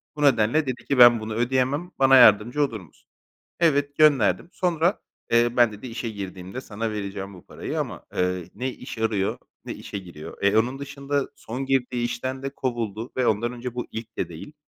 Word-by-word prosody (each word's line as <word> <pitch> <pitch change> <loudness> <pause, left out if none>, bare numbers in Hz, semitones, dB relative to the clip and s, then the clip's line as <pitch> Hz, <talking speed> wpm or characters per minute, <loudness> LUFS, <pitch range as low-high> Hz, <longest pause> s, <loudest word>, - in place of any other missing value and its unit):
Bu 150 - -6
nedenle 140 +2 +3
dedi 125 -1 -4
ki 140 - 0
ben 120 -2 +8
bunu 110 0 -5
ödeyemem, 130 +8 0
bana 135 0 +6
yardımcı 120 +5 +6
olur 115 -6 -2
musun? 85 - -19 0.5
Evet, 145 -3 +2
gönderdim. 145 - +4
Sonra, 175 +1 +1 0.3
eee, 120 +1 +3
ben 120 -2 +5
dedi 105 +5 -9
işe 115 0 -4
girdiğimde 95 +2 -7
sana 110 0 -4
vereceğim 100 -1 -5
bu 90 - -14
parayı - - -5
ama, - - -4
ııı, 90 -1 0
ne 130 +4 -2
iş 125 - -9
arıyor 110 -3 0 0.3
ne - - -4
işe 100 - -7
giriyor. 85 -5 -10
Eee, 100 +2 +3
onun 125 +5 +1
dışında 140 0 -3
son 135 0 -5
girdiği 125 -2 0
işten 130 +3 -4
de 135 - -2
kovuldu 120 -4 -4
ve 125 - +2
ondan 115 +3 +1
önce 125 0 -6
bu 120 - -4
ilk 115 0 -8
de - - -2
değil. 85 - -10
120 Hz, 190 wpm, -24 LUFS, 105-135 Hz, 0.5 s, ben